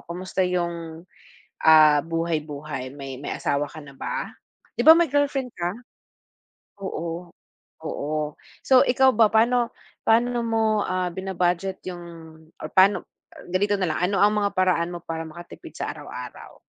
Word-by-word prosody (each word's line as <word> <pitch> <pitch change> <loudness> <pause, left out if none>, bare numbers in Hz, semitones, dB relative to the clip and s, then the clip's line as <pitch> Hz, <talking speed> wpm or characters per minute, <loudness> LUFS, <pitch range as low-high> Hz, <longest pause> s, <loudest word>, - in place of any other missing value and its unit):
kamusta 185 +2 -4
yung, 170 -2 -3 0.6
ah, 155 -2 +7
buhay-buhay? 155 -5 -3
May 135 -2 -7
may 145 - -5
asawa 145 +1 -1
ka 155 - -10
na 140 -1 -13
ba? - - -4 0.5
Di - - 0
ba 320 - +11
may 340 -5 +2
girlfriend 280 -3 0
ka? 175 0 -2 1.1
Oo. 170 -2 -5 0.6
Oo. 150 0 -3 0.3
So, 260 -1 +6
ikaw 260 +1 +4
ba, 220 -1 +5
pa'no 235 +2 +3 0.4
pa'no 240 +2 +3
mo, 220 -2 +1
ah, 185 -1 -1
bina-budget 190 0 -1
yung 175 -1 -7 0.6
or - - -5
pa'no 190 +2 +4 0.5
ganito 205 +2 +2
na 185 -3 0
lang. - - -3
Ano 200 - 0
ang 205 +1 +5
mga 200 - +2
paraan 180 -2 +2
mo 175 - -7
para 160 0 -4
makatipid 170 +2 -11
sa - - -3
araw-araw - - -10
180 Hz, 145 wpm, -24 LUFS, 160-215 Hz, 1.1 s, ba